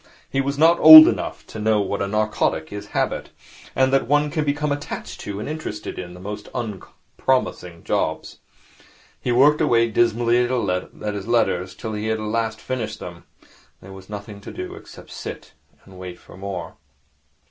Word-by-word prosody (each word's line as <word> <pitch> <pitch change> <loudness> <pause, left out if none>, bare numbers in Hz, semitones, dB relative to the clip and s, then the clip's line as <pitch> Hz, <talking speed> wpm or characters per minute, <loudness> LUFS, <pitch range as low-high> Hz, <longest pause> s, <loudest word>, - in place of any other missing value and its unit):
He 135 - -1
was 140 +1 -3
not 165 +3 +5
old 155 0 +12
enough - - -3
to 110 - -9
know 110 0 +2
what 100 0 -2
a 100 - -1
narcotic 105 -5 -1
is 105 - -7
Habit, - - -2 0.5
and 130 0 +2
that 135 - +2
one 145 +2 +2
can 155 -1 -1
become 145 0 -1
attached 145 0 -5
to 100 -1 -6
and 105 - -5
interested 155 -8 -6
in 90 -1 -8
the - - -12
most 105 +2 -7
unpromising 105 -4 -3
jobs. - - -2 0.8
He 125 - -2
worked 145 +6 +4
away 115 -6 +3
dismally 120 +1 +2
at 105 -4 -2
his 100 0 -6
letters 100 -6 0
till 110 - -6
he 105 +1 -3
had 110 0 0 0.4
finished 120 0 -5
them. - - -10 0.2
Then - - -26 0.4
there - - -10
was 95 0 -13
nothing 100 0 -8
to - - -9
do - - -7
except - - -13
sit - - -8 0.3
and 95 -1 -14
wait 90 -1 -8
for - - -16
more. 95 -1 -7
110 Hz, 170 wpm, -22 LUFS, 100-130 Hz, 0.8 s, old